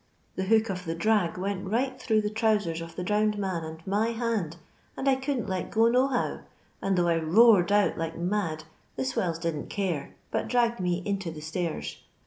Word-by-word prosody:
The 190 Hz, -, -2 dB
hook 220 Hz, +1 st, +3 dB
of 185 Hz, -1 st, -5 dB
the 165 Hz, 0 st, -2 dB
drag 185 Hz, -1 st, +1 dB
went 190 Hz, +1 st, -3 dB
right 255 Hz, +5 st, -1 dB
thro' 220 Hz, -3 st, +2 dB
the 210 Hz, 0 st, -2 dB
trowsera 210 Hz, -7 st, +1 dB
of 165 Hz, 0 st, -8 dB
the 180 Hz, -, -3 dB
drowned 210 Hz, +2 st, +1 dB
man 190 Hz, -5 st, -2 dB
and 160 Hz, +1 st, -8 dB
my 205 Hz, +3 st, +1 dB
hand, 225 Hz, -8 st, -2 dB, 0.4 s
and 270 Hz, -, -2 dB
I 270 Hz, -, +6 dB
couldn't 265 Hz, -2 st, -1 dB
let 185 Hz, -2 st, -2 dB
go 225 Hz, +1 st, +4 dB
no 250 Hz, +3 st, +4 dB
how, 255 Hz, -3 st, -1 dB, 0.4 s
and 195 Hz, -1 st, +1 dB
tho' 175 Hz, -1 st, +3 dB
I 170 Hz, -1 st, +3 dB
roared 185 Hz, +3 st, +5 dB
out 205 Hz, -6 st, +3 dB
like 165 Hz, 0 st, -3 dB
mad, 170 Hz, -3 st, -1 dB, 0.3 s
the 130 Hz, -, -2 dB
swells 165 Hz, +5 st, -1 dB
didn't 165 Hz, -3 st, -3 dB
care, 175 Hz, -8 st, -2 dB, 0.2 s
but -, -, -1 dB
dragged 235 Hz, -1 st, +2 dB
me 180 Hz, 0 st, -1 dB
into 195 Hz, -3 st, -2 dB
the 155 Hz, -2 st, -8 dB
stairs. 155 Hz, -, -3 dB
190 Hz, 200 wpm, -28 LUFS, 165-220 Hz, 0.4 s, I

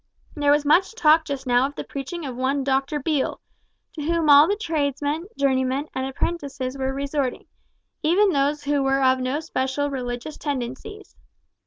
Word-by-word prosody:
There 290 Hz, -2 st, 0 dB
was 290 Hz, 0 st, +3 dB
much 365 Hz, +8 st, +3 dB
talk 320 Hz, -5 st, +4 dB
just 275 Hz, -2 st, -5 dB
now 250 Hz, +1 st, +3 dB
of 285 Hz, -, -11 dB
the -, -, -5 dB
preaching 290 Hz, +4 st, -6 dB
of 260 Hz, -3 st, -5 dB
one 265 Hz, +2 st, 0 dB
Doctor 275 Hz, +2 st, 0 dB
Beale, 290 Hz, -1 st, -1 dB, 0.5 s
to 310 Hz, -, -7 dB
whom 325 Hz, 0 st, +2 dB
all 285 Hz, +2 st, +8 dB
the 405 Hz, -, +1 dB
tradesmen, 305 Hz, -3 st, -2 dB
journeymen, 265 Hz, +1 st, 0 dB
and 260 Hz, 0 st, -2 dB
apprentices 270 Hz, -2 st, -3 dB
were 265 Hz, -1 st, -2 dB
resorting, 275 Hz, -1 st, -2 dB, 0.6 s
even 380 Hz, +6 st, +3 dB
those 285 Hz, 0 st, 0 dB
who 285 Hz, 0 st, +1 dB
were 270 Hz, 0 st, +1 dB
of 260 Hz, 0 st, +4 dB
no 255 Hz, +3 st, -1 dB
special 285 Hz, -2 st, -2 dB
religious 250 Hz, +2 st, -5 dB
tendencies. 290 Hz, -, -5 dB
285 Hz, 165 wpm, -23 LUFS, 265-305 Hz, 0.6 s, all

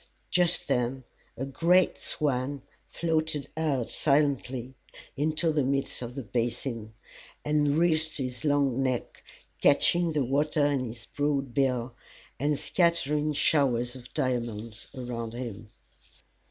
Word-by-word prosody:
Just 175 Hz, -1 st, +2 dB
then 125 Hz, +2 st, 0 dB, 0.3 s
a 135 Hz, -, -2 dB
great 170 Hz, +6 st, +3 dB
swan 140 Hz, -1 st, -2 dB, 0.3 s
floated 160 Hz, -3 st, -1 dB
out 145 Hz, -7 st, 0 dB
silently 135 Hz, -4 st, +1 dB, 0.4 s
into 155 Hz, +3 st, +1 dB
the 150 Hz, -1 st, +2 dB
midst 135 Hz, 0 st, 0 dB
of 120 Hz, 0 st, -6 dB
the 135 Hz, -, -4 dB
basin, 115 Hz, -1 st, -3 dB, 0.5 s
and 150 Hz, -1 st, +2 dB
wreathed 160 Hz, -2 st, +2 dB
his 125 Hz, -3 st, -4 dB
long 140 Hz, -3 st, +2 dB
neck, 130 Hz, -2 st, -2 dB, 0.4 s
catching 170 Hz, +3 st, +4 dB
the 150 Hz, -2 st, +2 dB
water 145 Hz, +3 st, +1 dB
in 140 Hz, -3 st, +1 dB
his 115 Hz, 0 st, -9 dB
broad 140 Hz, -3 st, -1 dB
bill, 125 Hz, -2 st, +1 dB, 0.5 s
and 145 Hz, +2 st, +1 dB
scattering 155 Hz, -4 st, +1 dB
showers 125 Hz, -5 st, +2 dB
of 125 Hz, -1 st, -12 dB
diamonds 120 Hz, -5 st, -2 dB
around 120 Hz, -3 st, -5 dB
him. 115 Hz, -4 st, -6 dB
135 Hz, 120 wpm, -28 LUFS, 125-150 Hz, 0.5 s, catching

